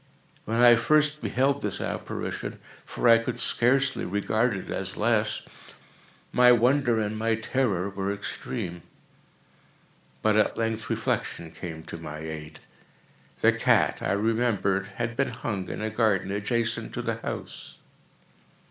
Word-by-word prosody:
When 115 +2 -1
I 120 -1 +7
first 150 +5 +2
beheld 140 +2 +1
this 105 - -3
apparition—for - - -4
I 115 -1 +8
could 115 - -4
scarcely 135 +3 +2
regard 105 +3 0
it - - -7
as 95 0 -3
less—my 115 +2 0
wonder 120 0 +3
and 105 0 -1
my 115 +1 +1
terror 110 -5 0
were 100 0 -3
extreme. 100 -2 -5 1.4
But 110 -1 +3
at 110 - +2
length 115 -1 -2
reflection 80 -1 -2
came 80 -3 -7
to 85 - -8
my 75 -2 -7
aid. 80 -1 -7 0.8
The - - +6
cat, - - +2
I - - 0
remembered, 105 -3 +1
had 115 0 -3
been 135 0 +1
hung 100 -6 -4
in - - -4
a 110 - -2
garden 105 -4 +1
adjacent 115 +3 -1
to - - -3
the - - -2
house. - - -7
110 Hz, 130 wpm, -26 LUFS, 100-120 Hz, 1.4 s, I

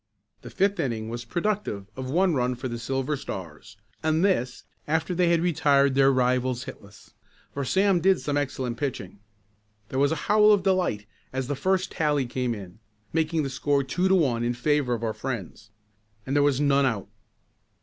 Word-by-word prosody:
The - - -9
fifth 200 +1 0
inning 110 -4 -2
was 120 0 -5
productive 175 - -2
of 130 -1 -5
one 180 +4 +2
run 125 -2 0
for 130 +2 -5
the 120 -1 -5
Silver 135 +4 -2
Stars 90 - -8 0.2
and 160 +3 +2
this 130 -10 0 0.2
after 160 +3 0
they 175 0 +2
had 170 -1 +3
retired 140 -5 +3
their 135 0 +5
rivals 130 0 +1
hitless, 100 +1 -12 0.4
for 140 - -3
Sam 190 +7 +2
did 190 +1 +4
some 145 - -2
excellent 130 -4 -2
pitching. 105 -9 -4 0.7
There 130 - -2
was 140 +2 +3
a - - +1
howl 210 0 +5
of 200 -3 +2
delight 180 - +1 0.3
as 130 0 -2
the 145 +3 -2
first 185 +5 0
tally 150 -4 +1
came 125 -1 -2
in, 100 0 -11 0.3
making 160 0 +1
the 135 - -2
score 140 +1 +1
two 175 +8 0
to 190 - +4
one 130 -10 +1
in 120 0 0
favor 135 -1 +1
of 115 - -7
our 110 -1 -1
friends. 110 -5 -6 0.6
And 135 - -2
there 145 - +4
was 145 -2 +2
none 140 -1 +3
out. 110 -6 -2
135 Hz, 185 wpm, -26 LUFS, 120-165 Hz, 0.7 s, their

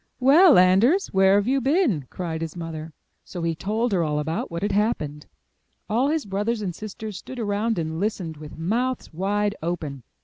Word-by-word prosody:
*'Well, 290 +6 +7
Anders, 200 - +4
where 190 0 +5
have 205 +2 +2
you 270 +1 +2
been?*' 265 - +1
cried 165 -3 -4
his 165 0 -5
mother. 165 -2 -6 0.3
So 175 -2 -7
he 165 0 0
told 215 +8 -1
her 185 -3 +2
all 150 -2 0
about 160 +2 -2
what 170 +2 -5
had 205 - 0
happened. 155 -8 -1 0.6
All 235 +6 +1
his 315 -1 -1
brothers 210 +3 -2
and 180 -3 -3
sisters 215 +1 -7
stood 260 - -9
around 220 0 -1
and 160 -1 -3
listened 190 -5 -2
with 150 0 -10
mouths 230 +7 -2
wide 205 +4 0
open. 155 -5 -4
195 Hz, 180 wpm, -24 LUFS, 165-230 Hz, 0.6 s, Well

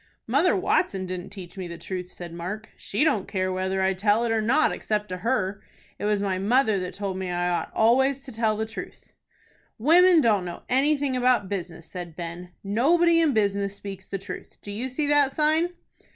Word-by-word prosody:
"Mother - - +3
Watson 195 - +1
didn't 180 -1 -5
teach 190 -1 -10
me 185 - -4
the 170 0 -7
truth," 180 +1 -5
said 175 -2 -9
Mark. 185 +6 -6
"She 210 - -1
don't 275 -12 +1
care 185 -2 -1
whether 190 +1 -1
I 190 0 +2
tell 205 +4 +2
it 230 - 0
or 225 -1 +2
not 255 +8 +3
except 210 -2 -2
to 185 - -4
her. 205 -2 -1 0.4
It - - -3
was 210 -1 +1
my 190 -2 -1
mother 220 0 +3
that 180 0 -5
told 195 -2 -3
me 185 -1 -3
I 175 0 0
ought 175 - -2
always 265 +4 +3
to 270 - -9
tell 220 -1 0
the 220 - -1
truth." 220 0 -9 0.6
"Women 340 +7 +6
don't 215 -9 +3
know 175 -1 -7
anything 275 +1 +2
about 245 -6 +2
business," 175 -4 -5
said 175 -3 -8
Ben. 175 +1 -6
"Nobody 330 - +3
in 310 -4 +3
business 200 -2 0
speaks 195 -2 -8
the 195 - -3
truth. 195 +2 -9
Do 205 - -7
you 235 +6 -3
see 290 +4 -1
that 290 -2 +3
sign?" 315 +3 +2
205 Hz, 200 wpm, -25 LUFS, 185-255 Hz, 0.6 s, Women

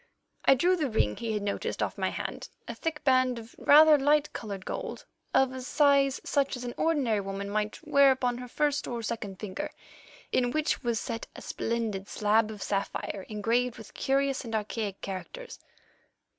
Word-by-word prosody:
I 270 - +7
drew 355 +8 +3
the 305 -6 -1
ring 105 - +1
he 230 -1 -3
had 210 -1 -2
noticed 200 0 -2
off - - -2
my - - 0
hand, - - -5 0.2
a - - -4
thick 315 -2 -4
band 255 -2 +3
of 230 0 -10
rather 305 0 +7
light 295 +2 +2
coloured 200 -4 -6
gold - - -5 0.3
of 265 -1 +3
a 260 - -5
size 275 0 +3
such 275 -2 0
as 250 - -7
an 240 -1 -4
ordinary 275 -10 +1
woman 195 0 -4
might 210 0 -1
wear 280 -2 +6
upon 250 -2 0
her 250 - -7
first 290 +3 0
or 235 -2 -4
second 210 -4 -4
finger, 200 -3 -4 0.6
in 245 -1 +2
which 310 +4 0
was 235 -2 0
set 230 -1 -5
a - - -9
splendid 220 -4 -2
slab 215 +1 +2
of 210 -2 -6
sapphire 195 -1 -3
engraved 230 +3 0
with 220 - -12
curious 275 0 0
and 225 -2 -4
archaic 210 -2 -3
characters. 470 - -7
240 Hz, 180 wpm, -29 LUFS, 215-275 Hz, 0.6 s, I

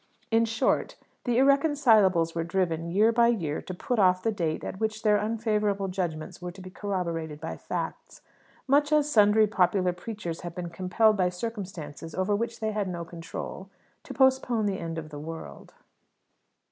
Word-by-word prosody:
In 225 +1 +4
short, 225 0 0 0.3
the 240 -2 +1
irreconcilables 245 - +4
were 165 - -1
driven, 170 -1 -1
year 210 +6 +4
by 235 0 +4
year, 170 -11 0
to - - -8
put 240 +5 -2
off 185 -2 +4
the 225 - +2
date 165 -6 -2
at 190 - -6
which 220 0 -2
their 210 -1 +4
unfavourable 210 -2 0
judgments 175 -4 -4
were 180 0 -5
to 195 - -14
be 185 0 -9
corroborated 170 -6 -3
by 160 +1 -5
facts, - - -6 0.4
much 290 +2 +3
as 300 -1 +3
sundry 215 -1 +5
popular 185 -3 +2
preachers 180 -3 -6
have 175 -1 -7
been 175 -2 -5
compelled 210 +5 +2
by 180 -2 +2
circumstances 180 -6 -6
over 190 +2 +1
which 230 +2 -3
they 220 0 0
had 210 -2 -1
no 170 -2 -4
control, 170 +3 -7 0.3
to - - -11
postpone 260 -4 +2
the 195 -2 -1
end 165 -1 -5
of 155 -1 -6
the 145 -1 -8
world. 160 +2 -9
195 Hz, 170 wpm, -27 LUFS, 170-225 Hz, 0.4 s, sundry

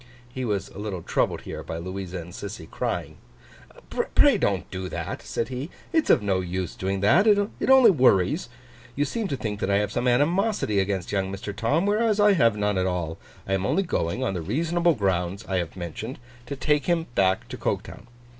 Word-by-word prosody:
He 130 - -4
was 100 -4 -2
a - - -11
little 100 -5 -4
troubled - - 0
here, - - -7
by 80 - -6
Louisa 95 +1 -5
and 85 0 -8
Sissy 100 -3 -7
crying. - - -3 0.7
'Pray - - +3
don't - - 0
do 95 0 -4
that,' - - -5
said 115 - -3
he, 130 +4 -5 0.2
'it's 320 -2 +2
of - - +5
no 95 -2 +1
use 90 -1 -3
doing 95 0 -2
that: 175 - +5
it 205 +2 +2
only 265 -4 +8
worries. 125 - +3 0.5
You 145 - +1
seem 225 - -2
to 140 - -2
think 105 -4 -4
that 95 - -1
I 100 - +3
have 105 0 0
some 120 +2 -1
animosity 155 - +2
against 95 -2 -1
young 95 -2 -1
Mr. 100 +1 -6
Tom; 140 - +1
whereas 215 +1 +2
I 205 0 +6
have 115 - +3
none 105 -2 +1
at 95 - +1
all. 85 -3 -3 0.3
I 95 - -1
am 95 -1 0
only 190 - +1
going, 120 - -1
on 110 - 0
the 90 - -3
reasonable 165 - +1
grounds 95 0 -1
I 95 - 0
have 85 -2 -3
mentioned, 95 - -6 0.3
to 140 - -4
take 145 +1 +1
him 170 -2 +1
back 95 -3 +2
to - - -5
Coketown. 110 - -4
105 Hz, 200 wpm, -25 LUFS, 95-150 Hz, 0.7 s, only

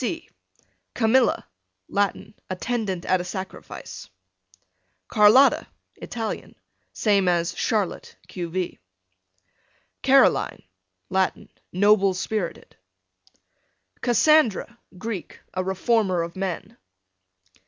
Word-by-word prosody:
C 325 +6 -3 0.7
Camilla, 240 +2 +3 0.4
Latin, 205 +1 -1 0.2
attendant 190 -2 -2
at 185 -1 +2
a - - -5
sacrifice. 190 +1 -8 1.0
Carlotta. 220 +6 +5 0.3
Italian, 225 -2 -5 0.4
same 200 -4 +2
as 170 -1 +1
Charlotte, 210 -5 -1
q. 175 -2 -5
v. 180 +1 -3 1.2
Caroline, - - +3 0.5
Latin, 190 0 0 0.2
noble 200 0 +4
spirited. 190 -2 -4 1.3
Cassandra, 240 -3 +3 0.2
Greek, 210 -1 -6
a 185 - -1
reformer 190 -1 +1
of 170 0 -7
men. 190 -3 -4
195 Hz, 80 wpm, -24 LUFS, 185-225 Hz, 1.3 s, Carlotta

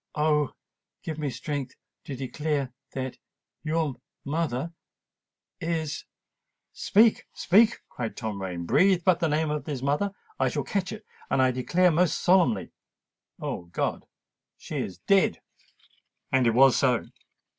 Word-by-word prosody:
——oh! 150 -2 +1 0.5
give 160 -1 -5
me 150 -2 -1
strength 140 0 -4 0.3
to 140 - -6
declare 135 0 -2 0.2
that——your 145 +3 -4 0.3
mother——is——" 160 +2 -5 0.7
"Speak, 220 +2 +3
speak!" 220 +5 +4
cried 115 -3 -5
Tom 110 -4 -4
Rain: 90 -2 -4
"breathe 185 - +4
but 185 -3 +4
the 165 - +2
name 155 +1 +1
of 150 -2 -3
his 140 -4 -4
mother—I 200 - -1
shall - - -2
catch 195 -2 -2
it—and 215 -9 -5
I 130 -1 +4
declare 170 +8 +2
most 170 +2 +2
solemnly——O 120 - -1
God! 85 - -3 0.5
she - - -6
is 90 - -3
dead!" 195 - +2 0.9
And 130 -2 +3
it 115 - +2
was 135 0 +7
so! 125 -4 +2
150 Hz, 120 wpm, -27 LUFS, 130-170 Hz, 0.9 s, was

